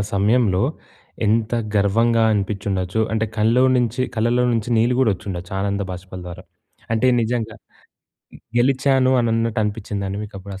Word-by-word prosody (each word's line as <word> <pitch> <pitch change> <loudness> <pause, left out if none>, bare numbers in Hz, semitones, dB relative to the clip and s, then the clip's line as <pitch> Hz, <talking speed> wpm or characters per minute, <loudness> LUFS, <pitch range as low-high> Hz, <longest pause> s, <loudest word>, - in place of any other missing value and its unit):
సమయంలో 100 -1 +2 0.6
ఎంత 110 +1 +1 0.2
గర్వంగా 115 +3 +2
అనిపించి 100 -1 -2
ఉండొచ్చు. 95 +3 -1
అంటే 110 0 0
కళ్ళో 115 +4 +3
నుంచి 120 0 0
కళ్ళలో 120 +3 +2
నుంచి 115 0 -1
నీళ్ళు 120 +2 +2
గూడా 110 -6 +3
ఒచ్చిండచ్చు, 90 -1 -7
ఆనంద 100 0 -1
భాష్పాల 90 0 -9
ద్వారా. 90 +1 -9 0.5
అంటే 125 +3 +2 0.2
నిజంగా 115 -1 -2 1.0
గెలిచాను 130 0 +3
అని 115 -1 0
అన్నట్టు 115 0 0
అనిపించిందా 105 -1 -4
అండి 100 +1 -4
మీకు 105 - -12
అప్పుడు 100 +1 -9
ఆ - - -17
110 Hz, 145 wpm, -21 LUFS, 100-120 Hz, 1.0 s, కళ్ళో